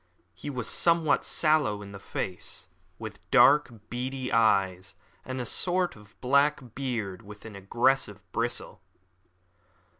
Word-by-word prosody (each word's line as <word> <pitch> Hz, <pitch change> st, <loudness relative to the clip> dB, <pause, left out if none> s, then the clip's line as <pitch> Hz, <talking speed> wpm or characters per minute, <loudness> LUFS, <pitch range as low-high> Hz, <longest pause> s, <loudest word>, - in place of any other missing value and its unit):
He -, -, -8 dB
was 125 Hz, -5 st, -3 dB
somewhat 165 Hz, -3 st, +3 dB
sallow 150 Hz, -11 st, +2 dB
in 100 Hz, -, -10 dB
the 100 Hz, -, -9 dB
face, 95 Hz, -2 st, -5 dB, 0.3 s
with -, -, -8 dB
dark, 145 Hz, +2 st, +6 dB, 0.2 s
beady 130 Hz, +1 st, -4 dB
eyes, 95 Hz, -5 st, +2 dB, 0.3 s
and 130 Hz, 0 st, -5 dB
a 125 Hz, -, -3 dB
short, 180 Hz, +7 st, +1 dB, 0.2 s
black 140 Hz, -2 st, +1 dB
beard 115 Hz, -9 st, -4 dB
with 105 Hz, +1 st, -13 dB
an 110 Hz, -2 st, -9 dB
aggressive 105 Hz, +1 st, 0 dB
bristle. 120 Hz, +3 st, -2 dB
120 Hz, 120 wpm, -27 LUFS, 105-140 Hz, 0.3 s, dark